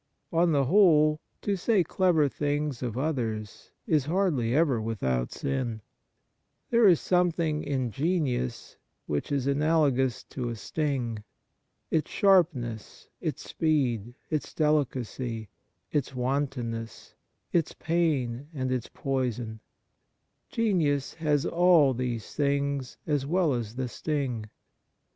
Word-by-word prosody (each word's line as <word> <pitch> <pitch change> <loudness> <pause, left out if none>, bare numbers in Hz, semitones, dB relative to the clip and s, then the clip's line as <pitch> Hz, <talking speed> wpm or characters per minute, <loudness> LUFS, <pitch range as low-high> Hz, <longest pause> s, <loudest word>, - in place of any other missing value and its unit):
On 170 +1 +3
the 140 -2 +3
whole, 155 -3 +5 0.2
to 205 - +1
say 195 +1 +2
clever 170 -3 +2
things 145 -1 -2
of 120 -2 -3
others 115 -8 -3 0.2
is 150 -4 +2
hardly 155 -9 +1
ever 145 -7 +3
without 65 - -1
sin. 130 -5 -2 0.9
There 235 -2 +6
is 175 -5 +6
some 180 -1 +3
thing 160 -2 -1
in 130 -4 -1
genius 130 - -1 0.3
which 75 - -2
is 140 -3 0
analogous 140 -3 +2
to 125 -3 -3
a 115 - -3
sting. 120 -4 -2 0.7
Its 160 - +1
sharpness, 150 - +1
its - - -4
speed, 125 -8 0 0.2
its 155 -2 -2
delicacy, 130 - -1 0.4
its 135 -3 -1
wantonness, 125 -3 -3 0.4
its 165 -3 +1
pain 145 -7 0
and 130 -2 -2
its 125 -2 -2
poison, 125 -5 -2 0.9
genius 165 - +1
has 150 -3 0
all 170 -6 +5
these 120 -3 -3
things 140 -2 -1
as 145 -3 0
well 170 -2 +2
as 115 -2 -3
the 130 0 -2
sting. 125 -5 -3
140 Hz, 115 wpm, -28 LUFS, 120-155 Hz, 0.9 s, There